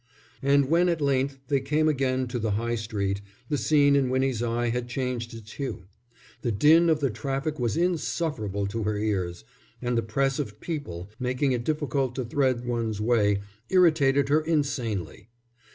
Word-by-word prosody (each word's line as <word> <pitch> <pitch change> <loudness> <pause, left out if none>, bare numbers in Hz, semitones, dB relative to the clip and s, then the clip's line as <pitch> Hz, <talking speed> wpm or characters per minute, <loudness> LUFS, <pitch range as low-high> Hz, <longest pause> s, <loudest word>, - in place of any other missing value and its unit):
And 140 0 +4
when 170 +4 +3
at 170 -2 0
length 135 -1 +1
they 140 -2 +2
came 150 +3 +1
again 130 -3 +1
to 120 0 -3
the 110 -1 -1
High 115 +1 -1
Street, 100 -3 -2 0.3
the 150 - +1
scene 145 -2 +4
in 135 -2 +2
Winnie's 130 -2 0
eye 120 0 0
had 120 +1 -2
changed 125 -2 -3
its 110 -1 -11
hue. 135 -7 -5 0.6
The 120 - 0
din 160 +11 +5
of 155 -2 +2
the 135 -3 +1
traffic 135 +7 -3
was 120 +3 0
insufferable 155 - -1
to 110 +3 -3
her 105 0 -1
ears, 95 -8 -2 0.4
and 125 -1 -1
the 115 - +2
press 135 +5 0
of 110 -7 -4
people, 105 - -5
making 130 +2 0
it 120 -2 -1
difficult 140 -3 -1
to 130 - -2
thread 130 -1 0
one's 115 -3 -2
way, 105 -3 +2 0.3
irritated 145 -7 +4
her 150 +2 +4
insanely. 120 - -2
130 Hz, 170 wpm, -26 LUFS, 115-145 Hz, 0.6 s, din